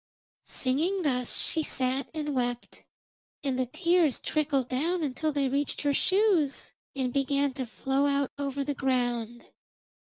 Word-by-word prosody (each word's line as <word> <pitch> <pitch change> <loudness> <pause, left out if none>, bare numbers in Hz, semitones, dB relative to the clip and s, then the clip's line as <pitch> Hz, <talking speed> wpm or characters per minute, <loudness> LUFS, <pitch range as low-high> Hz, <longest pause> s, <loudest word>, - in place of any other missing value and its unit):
Singing 325 +9 0
thus 250 -5 0
she 320 - +1
sat 260 -2 0
and 300 -2 -3
wept, 245 -2 -3 0.6
and 265 -3 -1
the 255 - +1
tears 335 0 +2
trickled 285 -4 0
down 325 +7 0
until 305 +2 -1
they 280 -2 +1
reached 280 +2 -1
her 285 -1 +1
shoes, 375 -5 +2 0.2
and 255 -2 -1
began 275 0 +1
to 260 -2 -4
flow 270 +4 0
out 280 -1 +1
over 280 -1 -2
the 290 +1 -2
ground. 245 -3 -1
275 Hz, 145 wpm, -28 LUFS, 255-300 Hz, 0.6 s, tears